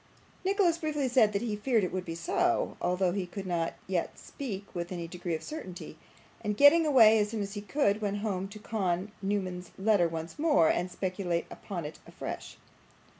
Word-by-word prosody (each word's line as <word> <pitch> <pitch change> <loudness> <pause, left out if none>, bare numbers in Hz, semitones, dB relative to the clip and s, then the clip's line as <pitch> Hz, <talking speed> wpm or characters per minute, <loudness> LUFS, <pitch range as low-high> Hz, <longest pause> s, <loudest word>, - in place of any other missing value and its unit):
Nicholas 375 -3 +2
briefly 300 -4 -1
said 245 -4 +4
that 200 +2 -1
he 220 -3 -1
feared 220 0 +1
it 180 - -1
would 185 -1 -2
be 165 - -5
so, 165 - +1
although 180 0 +1
he 185 -1 -2
could 195 +2 -6
not 170 -2 -1
yet 185 -3 -2
speak 205 -8 -6
with 175 -1 -4
any 170 -2 -4
degree 175 -1 -3
of 155 - -6
certainty; 290 - -7 0.5
and 210 -1 -1
getting 310 +3 +7
away 225 -6 +7
as 210 0 +1
soon 220 -1 -3
as 200 0 -6
he 205 - -4
could, 210 -2 +1
went 205 -1 -1
home 195 -3 -2
to 200 +2 -10
con 195 -3 -2
Newman's 185 -3 -2
letter 195 -3 +3
once 165 - -6
more, 295 - +4
and 180 +1 -1
speculate 180 -2 -2
upon 175 -6 -6
it 150 - -7
afresh. - - -7
200 Hz, 190 wpm, -30 LUFS, 180-225 Hz, 0.5 s, getting